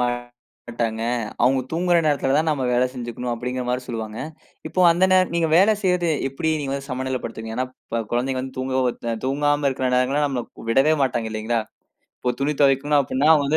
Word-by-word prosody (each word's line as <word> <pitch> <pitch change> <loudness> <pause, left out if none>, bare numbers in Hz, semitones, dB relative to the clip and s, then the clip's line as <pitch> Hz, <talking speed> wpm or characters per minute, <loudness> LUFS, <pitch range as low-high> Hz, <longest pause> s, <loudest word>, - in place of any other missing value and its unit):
மாட்டாங்க. 120 -2 -4 0.4
அவங்க 130 +2 +4
தூங்குற 175 +1 +2
நேரத்துலதான் 145 +1 +2
நாம 135 -4 -1
வேலை 125 +1 +3
செஞ்சுக்கணும், 120 0 -4
அப்படிங்கிற 125 +2 -4
மாரி 125 +1 -1
சொல்லுவாங்க. 110 -2 -5 0.5
இப்போ 185 - -1
அந்த 180 +3 +3
நேர 185 -1 +4
நீங்க 165 -1 +2
வேலை 200 +5 +5
செய்யறது 180 -3 +2 0.2
எப்படி 160 +4 -1
நீங்க 135 -2 -3
வந்து 140 0 -6
சமநிலைப்படுத்துவீங்க? 125 -4 -4
ஏன்னா 130 +1 0 0.2
இப்ப 115 0 -1
குழந்தைகள் 130 +2 0
வந்து 130 0 -8
தூங்க, 130 0 -2 0.5
தூங்காம 145 +1 +1
இருக்கிற 130 -1 -1
நேரங்கள்லாம் 135 +4 +2
நம்மள 130 -3 -2 0.3
விடவே 135 +6 +4
மாட்டாங்க, 120 -4 0
இல்லைங்களா? 110 +2 -1 0.6
இப்போ 125 - -1
துணி 145 +2 +1
துவைக்கணு 140 +2 +3
அப்படின்னா 140 +3 +1
வந்து 145 +3 +2
130 Hz, 165 wpm, -22 LUFS, 120-145 Hz, 0.6 s, வேலை